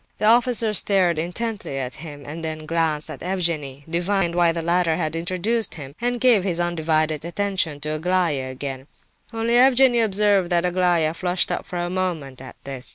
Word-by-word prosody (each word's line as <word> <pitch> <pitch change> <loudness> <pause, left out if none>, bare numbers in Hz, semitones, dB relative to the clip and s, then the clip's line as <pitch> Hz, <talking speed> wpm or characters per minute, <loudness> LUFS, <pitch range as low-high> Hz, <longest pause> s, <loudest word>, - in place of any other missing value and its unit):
The - - -1
officer 230 -1 +3
stared 185 -5 +2
intently 190 -2 -3
at 130 -1 -4
him, 145 -3 -9
then 155 +1 -6
glanced 160 -2 0
at 140 - -9
Evgenie, 165 -7 -1
divined 175 +1 0
why 175 -1 +3
the 165 0 -4
latter 170 -1 +2
had 160 -1 -2
introduced 185 +6 -1
him, 140 -4 -9
and 245 0 -1
gave 235 -7 +4
his 175 -3 -1
undivided 155 -3 0
attention 175 -4 -1
to 150 - -3
Aglaya 160 -5 0
again. 130 0 -6 0.4
Only 230 0 -1
Evgenie 255 -1 +5
Pavlovitch 225 - +4
observed 200 -3 +2
that 175 -1 +1
Aglaya 175 -3 +2
flushed 180 +1 -1
up - - -3
for 180 - -5
a 175 0 -1
moment 165 -9 -3
at 130 -2 -10
this. 135 -2 -4
175 Hz, 175 wpm, -22 LUFS, 155-195 Hz, 0.4 s, Evgenie